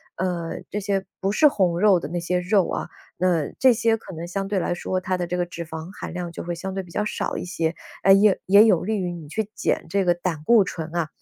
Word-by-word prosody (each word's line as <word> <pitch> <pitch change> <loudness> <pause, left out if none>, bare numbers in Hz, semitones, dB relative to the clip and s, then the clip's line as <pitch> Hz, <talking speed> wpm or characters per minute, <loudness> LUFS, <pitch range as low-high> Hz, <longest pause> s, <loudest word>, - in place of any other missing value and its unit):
嗯， 175 -2 -3
这 205 - -3
些 195 -1 -1 0.2
不 195 - 0
是 300 +9 +5
红 185 -10 +1
肉 200 -2 +5
的 145 - -5
那 175 +2 -2
些 180 +1 0
肉 180 0 +2
啊。 - - -3 0.3
那 175 -4 +1
这 260 -1 +6
些 230 0 +2
可 220 - -10
能 165 +1 -6
相 195 +2 -3
对 200 -2 +1
来 175 - -1
说， 185 +1 -2
它 185 0 -2
的 180 - -2
这 180 +1 -2
个 175 - 0
脂 170 -1 -7
肪 160 +1 -7
含 - - -6
量 175 -1 -4
就 - - -6
会 175 - -3
相 190 +3 -5
对 195 0 -3
比 175 - -15
较 210 - -1
少 - - -3
一 - - -4
些， 165 -2 -1 0.3
哎， 195 - +5
也 195 0 +6
也 200 +3 +8
有 195 -7 +3
利 215 +3 -1
于 180 -2 -2
你 160 -4 -9
去 215 +5 -3
减 - - -1
这 195 +3 +1
个 175 -1 +3
胆 175 -3 -4
固 225 +4 +5
醇 165 -2 -6
啊。 170 -2 0
180 Hz, 285 characters per minute, -23 LUFS, 170-200 Hz, 0.3 s, 也